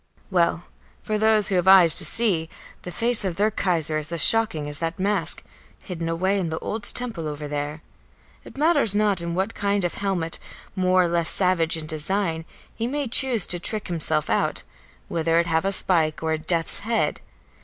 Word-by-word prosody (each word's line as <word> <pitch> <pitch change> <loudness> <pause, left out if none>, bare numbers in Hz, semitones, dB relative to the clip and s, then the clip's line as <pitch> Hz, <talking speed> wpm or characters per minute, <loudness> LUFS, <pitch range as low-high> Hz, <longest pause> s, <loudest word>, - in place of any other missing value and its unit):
Well, 170 -2 +1 0.4
for 215 0 -2
those 215 -2 +2
who 195 - -1
have 180 - -1
eyes 185 -4 +7
to - - +2
see, 180 -9 +2 0.3
the - - -8
face 235 +3 +3
of 185 -3 -3
their 210 +4 +1
Kaiser 165 -6 0
is 155 +1 -6
as 170 -3 +2
shocking 215 -10 +1
as 145 0 -3
that 165 0 -4
mask, 200 +2 0 0.3
hidden 170 -3 -6
away 185 +4 -1
in 175 -3 -3
the 160 - -4
old 220 +6 -5
temple 225 -11 +2
over 150 0 -6
there; 145 +2 -5 0.6
it - - -14
matters 290 - +4
not 205 -4 +1
in 170 0 -4
what 190 +5 -2
kind 200 -2 -1
of 175 - -3
helmet, 185 -5 -3 0.4
more 185 -1 +2
or - - 0
less 170 -1 0
savage 180 -4 +2
in 160 - -7
design, 160 +2 -3 0.3
he 230 - -4
may 285 +1 -3
choose 235 -4 +2
to 175 - -3
trick 210 +3 -5
himself 160 -3 +1
out, - - -1 0.4
whether 165 0 -1
it 170 - +1
have 160 +1 -1
a 195 - 0
spike 165 -5 +1
or 160 0 -1
a - - -1
death's 165 +1 -1
head. 225 +2 -2
180 Hz, 195 wpm, -23 LUFS, 165-205 Hz, 0.6 s, eyes